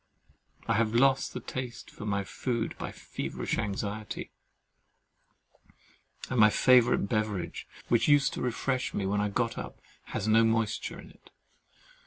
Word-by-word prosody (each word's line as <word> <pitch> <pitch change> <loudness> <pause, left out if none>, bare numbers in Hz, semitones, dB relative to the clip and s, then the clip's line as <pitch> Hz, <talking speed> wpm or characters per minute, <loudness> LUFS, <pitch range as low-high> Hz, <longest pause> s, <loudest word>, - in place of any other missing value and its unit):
I 115 - +2
have 115 0 +1
lost 135 +2 +3
the - - -2
taste 125 -2 -6
of 105 - -8
my 100 -1 0
food 120 +2 -3
by - - -4
feverish - - -4
anxiety; 105 0 -4 2.0
and 130 - -1
my 105 0 +8
favourite 120 -2 +4
beverage, 105 -6 -2 0.2
which 120 - +3
used 145 -2 +4
to - - -4
refresh 125 +1 -1
me 100 - -1
when 100 +2 +1
I 105 - 0
got 115 - -1
up, 60 - -8 0.3
has 105 - -3
no 110 +1 +5
moisture 115 -1 0
in - - -12
it. - - -21
115 Hz, 145 wpm, -29 LUFS, 105-125 Hz, 2.0 s, my